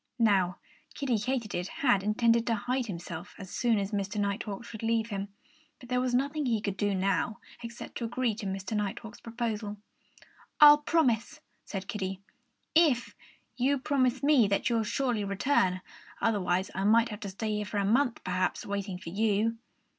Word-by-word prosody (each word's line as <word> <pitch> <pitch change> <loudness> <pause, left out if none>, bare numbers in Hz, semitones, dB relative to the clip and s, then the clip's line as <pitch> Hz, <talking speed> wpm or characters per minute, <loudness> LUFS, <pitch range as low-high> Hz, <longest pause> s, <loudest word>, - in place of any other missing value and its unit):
Now, 195 -6 +3 0.4
Kiddie 255 -6 0
Katydid 220 -6 -2
had 240 -6 +2
intended 230 +3 +2
to 230 - +2
hide 250 +4 -1
himself 170 -4 -7
as 190 -2 -9
soon 235 -3 +2
as 200 0 -2
Mr. 205 0 -2
Nighthawk 200 +2 -2
should 220 -2 -9
leave 225 0 0
him. 200 0 -3 0.5
But 245 - -13
there 250 0 +1
was 250 -1 0
nothing 285 +2 0
he 225 -3 +2
could 200 -2 -3
do 205 0 0
now 195 +3 0 0.2
except 235 0 -7
to 235 - -2
agree 240 0 0
to 210 -1 -6
Mr. 195 +2 -3
Nighthawk's 210 +2 -4
proposal. 225 -3 -4 0.8
"I'll 295 0 +10
promise," 295 -2 +1 0.3
said 195 -1 -5
Kiddie, 190 -2 -3 0.5
"if 300 -7 +3 0.4
you'll 270 +3 +2
promise 260 -1 +1
me 280 -7 +5
that 200 +4 0
you'll 230 -1 +2
surely 235 0 -1
return. 195 -2 +1 0.4
Otherwise 190 -4 +1
I 190 - -2
might 225 +3 +4
have 210 -2 -6
to 205 -2 -5
stay 210 +2 -2
here 210 - -2
for 205 - -4
a 200 - +1
month, 245 +4 +2
perhaps, 185 0 -1
waiting 200 -2 -3
for 180 -2 -8
you." 220 +3 +1
220 Hz, 170 wpm, -29 LUFS, 200-245 Hz, 0.8 s, I'll